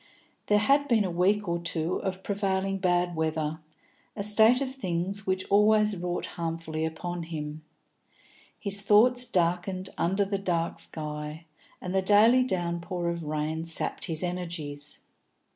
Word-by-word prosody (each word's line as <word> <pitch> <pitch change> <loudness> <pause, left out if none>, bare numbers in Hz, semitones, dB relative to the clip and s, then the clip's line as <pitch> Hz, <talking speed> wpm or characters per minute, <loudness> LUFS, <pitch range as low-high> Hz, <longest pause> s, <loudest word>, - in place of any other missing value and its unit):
There 210 - +4
had 280 +7 +3
been 225 -6 +2
a 185 - -2
week 195 +4 +1
or 170 0 -1
two 170 0 -1
of 190 -1 -4
prevailing 195 -1 -1
bad 175 -1 +1
weather, 160 -1 -2 0.6
a 200 - -3
state 220 +4 +5
of 265 -1 -3
things 195 -3 -2
which 185 0 -1
always 210 +1 +4
wrought 175 0 -3
harmfully 165 -1 -4
upon 175 +2 -5
him; 155 -2 -6 1.0
his 200 -1 +3
thoughts 245 +5 +4
darkened 185 0 -1
under 195 +4 +1
the 200 0 -2
dark 170 -3 -1
sky, 150 +1 -4 0.3
and 180 - -5
the 190 - +2
daily 215 +6 +5
downpour 175 -4 -2
of 170 -1 -4
rain 155 +1 -2
sapped 165 0 +3
his 165 -1 -3
energies. 165 -5 -4
180 Hz, 145 wpm, -27 LUFS, 165-200 Hz, 1.0 s, state